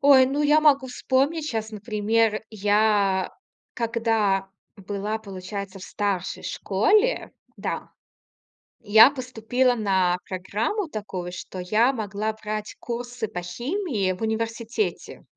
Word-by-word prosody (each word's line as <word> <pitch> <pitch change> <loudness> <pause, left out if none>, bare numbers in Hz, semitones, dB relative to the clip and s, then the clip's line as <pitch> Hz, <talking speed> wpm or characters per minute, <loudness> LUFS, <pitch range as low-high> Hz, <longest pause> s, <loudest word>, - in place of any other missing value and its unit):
ой, 270 -2 +7
ну 285 +3 0
я 300 +1 +5
могу 280 -3 +4
вспомнить 275 +5 0
щас, 220 -1 -3
например, 215 +1 0
я 205 -2 +2 0.4
когда 225 -5 +1 0.3
была, 205 +2 -3
получается, 195 -1 -7
в 185 - -9
старшей 200 -3 -2
школе, 415 - +1 0.2
да, - - -4 0.9
я 220 +2 +8
поступила 250 -1 0
на 190 -5 +2
программу 215 - -2
такую, 190 -6 -5
что 185 +1 -7
я 220 +8 +3
могла 215 -1 -2
брать 215 -1 -5
курсы 240 -1 -4
по 180 - -5
химии 240 - -2
в 185 - -12
университете. 230 - -2
220 Hz, 115 wpm, -25 LUFS, 200-250 Hz, 0.9 s, я